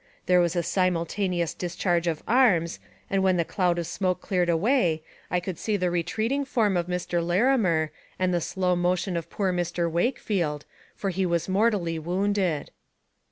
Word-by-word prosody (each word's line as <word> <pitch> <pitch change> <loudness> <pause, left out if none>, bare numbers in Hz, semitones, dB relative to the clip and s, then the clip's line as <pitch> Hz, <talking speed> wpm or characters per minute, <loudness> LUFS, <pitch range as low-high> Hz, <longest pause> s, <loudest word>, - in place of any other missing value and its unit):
There 180 0 +4
was 175 0 0
a 175 - +1
simultaneous 180 0 0
discharge 175 -1 -1
of 160 -2 -2
arms, 200 -10 +3 0.3
and 195 0 +1
when 190 -1 +3
the 170 - +1
cloud 180 -1 0
of 170 - -2
smoke 185 +1 -1
cleared 180 -2 0
away, 170 - +2 0.3
I 180 - +1
could 175 -1 -6
see 215 -2 0
the 180 -2 0
retreating 220 +11 0
form 225 -7 +1
of 175 -1 0
Mr. 180 -1 -1
Larimer 175 - +2 0.3
and 185 -1 +1
the 175 - +1
slow 180 +1 0
motion 180 +1 0
of 170 -1 -4
poor 190 -3 -1
Mr. 175 -1 -1
Wakefield, 170 - -1 0.3
for 195 - -2
he 190 +2 -1
was 170 -1 0
mortally 190 -5 +1
wounded. 180 -2 -1
180 Hz, 165 wpm, -26 LUFS, 170-195 Hz, 0.3 s, There